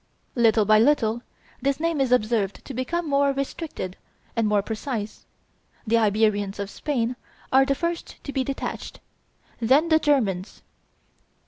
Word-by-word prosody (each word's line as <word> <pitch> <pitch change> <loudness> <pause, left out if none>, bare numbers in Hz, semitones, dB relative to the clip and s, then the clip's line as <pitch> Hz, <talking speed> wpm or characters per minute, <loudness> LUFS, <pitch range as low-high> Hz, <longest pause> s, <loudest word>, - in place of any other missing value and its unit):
Little 225 -3 +4
by 215 +1 +6
little 235 -3 +3 0.4
this 275 +2 0
name 330 -3 0
is 260 -2 +1
observed 215 -4 +1
to 275 - -7
become 320 +7 -2
more 280 -1 +3
restricted 275 - -4 0.4
and 230 -2 +2
more 210 -1 +2
precise. 220 0 -5 0.6
The 230 +1 +3
Iberians 205 -2 +1
of 200 0 -4
Spain 250 -5 -1 0.4
are 265 +1 +6
the 275 0 +1
first 335 +3 -3
to 280 - -6
be 265 - +1
detached; 270 +1 -5 0.6
then 270 +8 +3
the 315 -1 +5
Germans. 220 - 0
245 Hz, 140 wpm, -24 LUFS, 215-280 Hz, 0.6 s, by